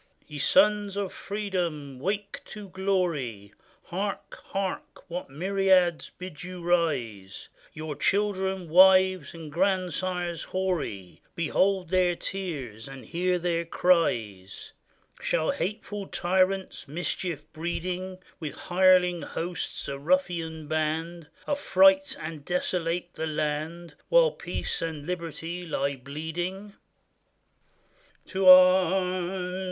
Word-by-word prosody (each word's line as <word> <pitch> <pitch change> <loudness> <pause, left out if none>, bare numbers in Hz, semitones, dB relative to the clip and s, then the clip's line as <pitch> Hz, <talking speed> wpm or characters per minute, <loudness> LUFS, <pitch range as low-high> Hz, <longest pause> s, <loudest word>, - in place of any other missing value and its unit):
] - - -36
Ye 150 -1 -7
sons 205 +4 +3
of 200 -2 -2
freedom, 175 -10 -3
wake 200 +6 -3
to 210 -2 -9
glory! 170 - -1 0.3
Hark! 195 +3 -4
hark! 195 -1 -4
what 175 -3 -4
myriads 185 +2 +2
bid 180 -4 -8
you 180 0 -7
rise! 130 - -1 0.2
Your 155 -1 -5
children, 190 +1 0
wives, 185 -1 +5
and 160 -2 -9
grandsires 180 -1 0
hoary. 165 - -3
Behold 185 +2 +1
their 180 -1 +3
tears 145 - -5
and 135 -1 -10
hear 180 +1 0
their 170 -1 0
cries! 115 - 0 0.5
Shall 160 - +1
hateful 205 +2 -4
tyrants, 190 +1 0
mischief 165 0 -3
breeding, 180 +3 -3 0.2
With 155 -4 -5
hireling 180 -1 +3
hosts, 175 +3 -4
a 140 0 -4
ruffian 165 - 0
band, 155 +2 -2 0.2
Affright 290 0 +4
and 155 -2 -6
desolate 175 0 -1
the 160 - -3
land, 155 +2 -3 0.2
While - - +5
peace - - -4
and 160 -3 -4
liberty 170 0 -4
lie 140 -2 -1
bleeding? 165 +9 -5 1.6
To 190 -1 0
arms 185 0 +5
175 Hz, 105 wpm, -27 LUFS, 155-190 Hz, 1.6 s, wives